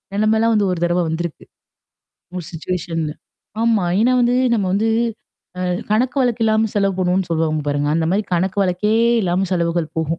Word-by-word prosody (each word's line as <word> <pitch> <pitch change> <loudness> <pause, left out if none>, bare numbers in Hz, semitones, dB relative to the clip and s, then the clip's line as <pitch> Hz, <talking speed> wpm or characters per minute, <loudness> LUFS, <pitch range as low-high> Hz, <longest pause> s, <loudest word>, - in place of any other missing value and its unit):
நெலமைல்லாம் 220 +2 +2
வந்து 205 -1 +2
ஒரு 175 - -2
தடவ 175 +1 +1
வந்திருக்கு. 165 0 -4 0.9
ஒரு 175 - -5
சிச்சுவேஷன்ல 165 -2 -3 0.5
ஆமா. 225 -5 +2 0.2
ஏன்னா 250 +2 +3
வந்து 240 +1 +2 0.2
நம்ம 200 -3 0
வந்து 220 +3 +1 0.7
அ - - -2 0.3
கணக்கு 250 +5 +1
வழக்கு 240 -2 0
இல்லாம 220 0 +2
செலவு 195 -1 +2
போணும்னு 180 +1 +1
சொல்லுவாங்க 160 -1 0
பாருங்க. 145 0 0
அந்த 165 -1 +1
மாரி 205 +2 +1
கணக்கு 190 +3 -1
வழக்கே 210 +5 0 0.3
இல்லாம 180 +1 0
செலவுகள் 170 -2 -1
போகும். 160 - 0
185 Hz, 160 wpm, -19 LUFS, 170-220 Hz, 0.9 s, ஏன்னா